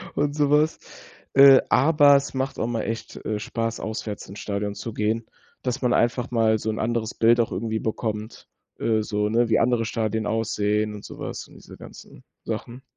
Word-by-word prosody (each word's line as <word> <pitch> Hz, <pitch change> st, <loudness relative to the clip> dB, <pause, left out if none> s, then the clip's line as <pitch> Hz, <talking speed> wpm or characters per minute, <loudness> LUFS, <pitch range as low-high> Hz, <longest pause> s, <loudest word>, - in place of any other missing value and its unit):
und 145 Hz, 0 st, 0 dB
so 145 Hz, -2 st, +2 dB
was. 150 Hz, +2 st, +2 dB, 0.5 s
Äh, 135 Hz, -1 st, +8 dB
aber 145 Hz, +1 st, +5 dB
es 140 Hz, -, 0 dB
macht 130 Hz, 0 st, -3 dB
auch 115 Hz, -, 0 dB
mal 115 Hz, -2 st, -2 dB
echt, 115 Hz, 0 st, -5 dB
äh, 105 Hz, -1 st, -2 dB
Spaß, 115 Hz, +1 st, -3 dB
auswärts, 110 Hz, -2 st, -5 dB
ins 100 Hz, +2 st, -10 dB
Stadion 100 Hz, 0 st, -3 dB
zu 115 Hz, -, -6 dB
gehen, 110 Hz, +2 st, -1 dB, 0.4 s
dass 125 Hz, 0 st, -2 dB
man 125 Hz, -1 st, +2 dB
einfach 120 Hz, +1 st, +1 dB
mal 110 Hz, -2 st, +3 dB
so 110 Hz, -, -3 dB
'n 110 Hz, -, -5 dB
anderes 115 Hz, -1 st, -1 dB
Bild 115 Hz, +1 st, +4 dB
auch 115 Hz, -, +1 dB
irgendwie 110 Hz, +3 st, -2 dB
bekommt, 110 Hz, -1 st, -4 dB, 0.3 s
äh, 110 Hz, -1 st, +1 dB
so 105 Hz, 0 st, -1 dB
'ne, 115 Hz, +1 st, +2 dB
wie 110 Hz, -, +3 dB
andere 115 Hz, -1 st, +2 dB
Stadien 110 Hz, -1 st, -2 dB
aussehen 105 Hz, -1 st, 0 dB
und 105 Hz, -, -10 dB
so -, -, -10 dB
was -, -, -6 dB
und -, -, -18 dB
diese -, -, -14 dB
ganzen -, -, -13 dB, 0.2 s
Sachen. 120 Hz, +3 st, -5 dB
115 Hz, 195 wpm, -24 LUFS, 110-125 Hz, 0.5 s, Äh